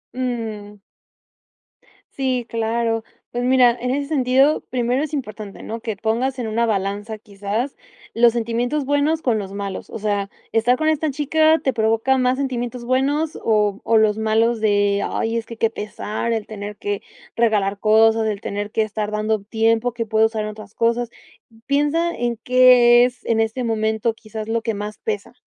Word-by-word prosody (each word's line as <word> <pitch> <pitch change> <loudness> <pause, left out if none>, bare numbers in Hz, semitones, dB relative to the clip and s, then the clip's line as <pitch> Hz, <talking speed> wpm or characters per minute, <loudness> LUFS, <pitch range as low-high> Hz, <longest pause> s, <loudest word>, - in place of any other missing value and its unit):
Mm. 225 -5 -4 1.3
Sí, 255 -3 -1
claro. 230 0 -1 0.3
Pues 245 0 -2
mira, 250 -1 +5
en 250 - -1
ese 280 +2 -1
sentido, 270 0 +3
primero 250 +1 0
es 310 - -4
importante, 215 -7 -6
¿no? 225 +1 -5
Que 220 -2 -4
pongas 235 +6 -1
en 240 - -3
una 230 +2 0
balanza 205 +1 -2
quizás, 205 +5 -4 0.4
los 235 0 +4
sentimientos 240 +5 -1
buenos 290 +3 +1
con 230 -4 +1
los 195 -1 -6
malos. 200 -1 -5
O - - -6
sea, 205 -2 -1 0.2
estar 235 +3 +3
con 310 +2 0
esta 315 0 +1
chica 310 +3 +3
te 265 - +1
provoca 225 +4 +2
más 255 +1 +2
sentimientos 245 -3 -3
buenos 285 +5 0
o, 210 -2 +2
o 225 - +3
los 215 -1 +3
malos 225 +1 +2
de: 205 -1 +2
"Ay 225 +1 -1
es 230 - -4
que 230 - -9
qué 225 0 +1
pesar 215 +1 -4
el 220 -2 -2
tener 210 -1 -7
que, 205 -1 -3 0.3
regalar 205 -4 +1
cosas, 220 +1 +4
el 210 -2 -2
tener 205 +1 -4
que 220 - +1
estar 215 0 -3
dando 215 +1 0
tiempo 225 +2 +1
que 235 -1 -3
puedo 220 0 +3
usar 220 -1 -3
otras 215 -1 -9
cosas". 235 +1 +1 0.6
Piensa 295 +4 +1
en 240 -1 -2
qué 250 -1 +6
es 250 0 -6
en 225 -1 +1
este 225 +3 0
momento 220 0 0
quizás 220 -1 -8
lo 225 0 0
que 225 -2 -2
más 210 +1 -6
pesa. 435 -1 -4
230 Hz, 170 wpm, -21 LUFS, 215-255 Hz, 1.3 s, qué